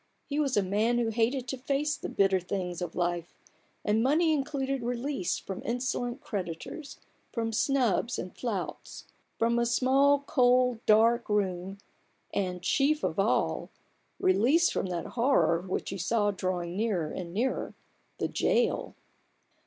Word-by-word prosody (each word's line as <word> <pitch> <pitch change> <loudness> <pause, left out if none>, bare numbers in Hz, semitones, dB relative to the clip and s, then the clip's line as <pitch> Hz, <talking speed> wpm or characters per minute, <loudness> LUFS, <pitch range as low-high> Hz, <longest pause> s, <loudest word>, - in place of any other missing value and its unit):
He 290 0 -2
was 275 -6 +1
a 205 - +4
man 215 +5 +1
who 235 -2 +1
hated 240 +3 0
to 265 - -3
face 285 +3 0
the - - -6
bitter 195 -1 +3
things 180 -1 -4
of 175 -2 -4
life: 175 -1 -2 0.5
and 215 +2 +2
money 315 +6 +3
included 275 -2 -1
release 245 -3 -2
from 190 - -6
insolent 245 +1 -2
creditors, 190 - -6 0.3
from 225 -1 -2
snubs 245 -2 +1
and 180 - -6
flouts, 210 -7 -5 0.3
from 235 +1 +2
a 235 - +2
small, 270 +4 +3
cold, 250 -3 +3
dark 230 +2 +4
room, 195 -2 -1 0.6
and, 180 -2 -2
chief 295 +2 +2
of 160 - -1
all! 200 +4 +1 0.5
release 245 - +4
from - - -1
that 175 -2 -3
horror 235 -9 +2
which 185 0 -3
he 195 - -5
saw 205 +3 +1
drawing 180 -2 -3
nearer 195 -7 -1
and 175 -2 -6
nearer: 235 +8 -1 0.4
the - - -1
gaol. 480 -1 0
230 Hz, 145 wpm, -29 LUFS, 185-265 Hz, 0.6 s, a